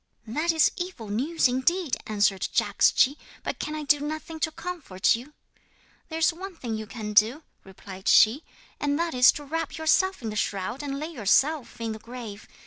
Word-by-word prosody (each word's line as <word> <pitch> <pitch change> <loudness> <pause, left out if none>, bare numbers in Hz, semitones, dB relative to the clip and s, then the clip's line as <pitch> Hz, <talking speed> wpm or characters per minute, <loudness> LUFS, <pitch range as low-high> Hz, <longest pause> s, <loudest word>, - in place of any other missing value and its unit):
'"That 300 +10 0
is 320 -1 +4
evil 350 - -6
news 275 +10 +1
indeed," 270 +5 +1
answered 205 -2 +1
Jagdschi; 280 +3 +3 0.3
"but - - -4
can 305 - -4
I 305 - -4
do 295 0 +3
nothing 310 +2 -5
to 315 - +1
comfort 305 - -1
you?" 255 +6 -10 0.8
'"There 320 - -4
is 325 +1 +3
one 375 +2 -8
thing 240 -8 -5
you 220 0 -4
can 210 -2 -6
do," 230 +9 +4 0.2
replied 190 0 -11
she, 240 +8 +6 0.4
"and 285 0 0
that 335 0 -1
is 250 0 +7
to 295 - -7
wrap 325 +3 -4
yourself 320 +1 +2
in 220 - -3
the - - -6
shroud 205 +5 -2
and 280 -1 -4
lay 310 +3 -5
yourself 270 - +1
in 230 -1 -3
the 220 - -6
grave. 225 -2 -9
275 Hz, 185 wpm, -26 LUFS, 220-320 Hz, 0.8 s, is